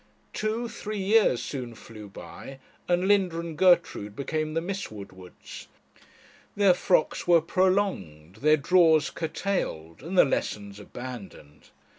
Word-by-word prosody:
Two 220 +3 -2
three 215 -2 -6
years 200 - +3
soon 125 -4 -6
flew 110 -2 -11
by, 135 +6 -10 0.3
and 180 +1 +1
Linda 190 -5 +2
and 170 -1 -6
Gertrude 170 - +2
became 155 +3 -3
the - - +2
Miss 190 +4 -4
Woodwards; 95 -4 -11 0.9
their 200 -2 +5
frocks 175 -2 +1
were 170 -1 +6
prolonged, 165 - -1
their 155 +5 +4
drawers 160 -1 +4
curtailed, 155 - -3
and 175 +6 -5
the - - +8
lessons 100 -6 -3
abandoned. 105 - -10
160 Hz, 125 wpm, -26 LUFS, -, 0.9 s, the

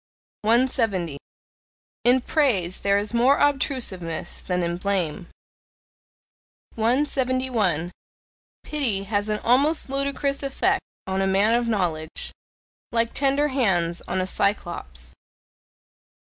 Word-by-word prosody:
170. 220 - +1 0.9
In 250 +2 +5
praise 220 - +1
there 200 0 +2
is 205 +2 -2
more 250 +4 +4
obtrusiveness 250 - -1
than 180 -1 -1
in 170 0 -1
blame. 180 -3 -1 1.5
171. 245 - +1 0.7
Pity 245 -10 -1
has 205 +1 -1
an 210 - +1
almost 275 +4 +3
ludicrous 275 0 -1
effect 375 +8 +1 0.2
on 190 0 -1
a 195 - +1
man 200 +4 +3
of 240 0 +1
knowledge, 170 -7 -2 0.6
like 230 0 0
tender 280 +2 +2
hands 185 -10 +1
on 185 - -1
a 185 - 0
Cyclops. 170 - -2
220 Hz, 105 wpm, -24 LUFS, 180-260 Hz, 1.5 s, In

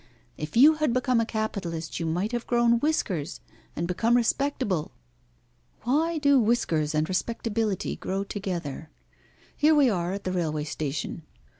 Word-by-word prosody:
If 150 +8 -5
you 295 +6 +8
had 305 -6 +1
become 255 -1 +2
a 225 - -2
capitalist 190 -8 -3
you 165 - -2
might 180 +7 -1
have 240 -1 -3
grown 235 -1 +3
whiskers 190 - -1 0.4
and 170 - -2
become 225 +7 +2
respectable. 245 - 0 0.9
Why 315 +7 +1
do 285 -2 +4
whiskers 165 -10 +1
and 155 +1 +1
respectability 220 +1 -2
grow 195 +1 -2
together? 175 -7 -5 0.7
Here 310 +1 +4
we 280 -5 +5
are 175 -1 -1
at 200 - -5
the 185 - -2
railway 155 -4 -1
station. 150 +1 -4
205 Hz, 145 wpm, -26 LUFS, 170-245 Hz, 0.9 s, you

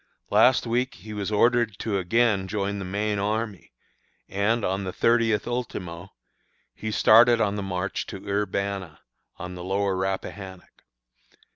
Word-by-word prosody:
Last 130 0 +5
week 125 +3 -1
he 110 +3 -10
was 105 0 -3
ordered 115 0 +2
to 100 -3 -1
again 100 0 +2
join 100 0 -2
the 95 - -5
main 105 +2 -1
army, 105 -1 -3 0.6
and, 105 +4 0
on 95 +2 -1
the 95 - -3
thirtieth 115 0 +2
ultimo, 95 -7 -5 0.6
he 110 - -5
started 115 +2 +6
on 105 -3 +1
the 105 - -3
march 95 0 -3
to - - -6
Urbanna, 100 -4 -2 0.4
on 90 +1 -7
the 90 -1 -8
Lower 95 +1 0
Rappahannock. 95 0 -5
100 Hz, 140 wpm, -25 LUFS, 95-110 Hz, 0.6 s, started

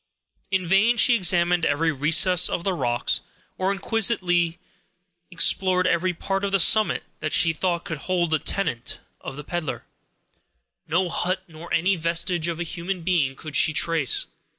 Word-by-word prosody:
In 190 -1 -1
vain 200 +7 +3
she 245 - +5
examined 175 -4 +2
every 160 +2 +1
recess 165 +5 +3
of 170 - -3
the 195 - 0
rocks, 120 -8 0 0.4
or 190 +1 +1
inquisitively 190 -5 0 0.7
explored 185 +1 +2
every 180 0 +1
part 195 +3 -3
of 200 - -1
the 195 - +2
summit 215 +4 +3 0.2
that 155 - -3
she 165 -1 +4
thought 170 0 -2
could 160 -3 -5
hold 175 -2 -1
the 155 - +2
tenement 125 -13 -2 0.2
of - - -8
the 150 - -8
peddler. 170 -1 -5 1.0
No 180 +3 0
hut, 185 +2 -2
nor 165 +1 -12
any 190 +3 +2
vestige 170 +1 0
of 170 -1 -3
a - - -1
human 175 +2 -5
being 160 -7 0
could 155 +1 -8
she 155 - +4
trace. 160 -4 +1
175 Hz, 160 wpm, -23 LUFS, 165-185 Hz, 1.0 s, she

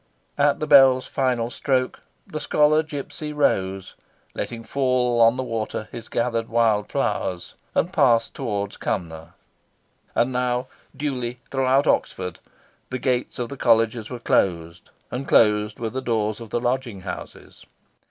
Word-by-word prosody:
At 145 0 +3
the 155 - -1
bell's 135 -3 +6
final 125 -3 -1
stroke, 130 -2 0 0.3
the 155 - -6
Scholar 150 +1 +3
Gipsy 150 0 -6
rose, 95 -10 0 0.4
letting 115 -1 -5
fall 125 -1 +1
on 115 +2 +5
the 130 - -1
water 110 -2 -4
his 115 -1 -8
gathered 115 -1 -1
wild 110 -3 +2
flowers, 90 -2 -2 0.2
and - - +1
passed 115 -1 +3
towards 100 -6 -3
Cumnor. 80 -3 -4 0.8
And 120 +2 +2
now, 125 0 0 0.3
duly, 125 -4 -3
throughout 135 +1 +2
Oxford, 90 - 0 0.5
the 130 - -3
gates 125 -1 -1
of 120 -1 -3
the 140 - -7
Colleges 115 -2 +2
were 125 - -5
closed, 85 -6 0 0.2
and 130 +3 -4
closed 105 -1 +3
were 115 -1 -3
the 130 - -3
doors 110 -3 -1
of 115 - -9
the 120 - -1
lodging 120 -4 -2
houses. 90 - -9
120 Hz, 140 wpm, -23 LUFS, 110-130 Hz, 0.8 s, bell's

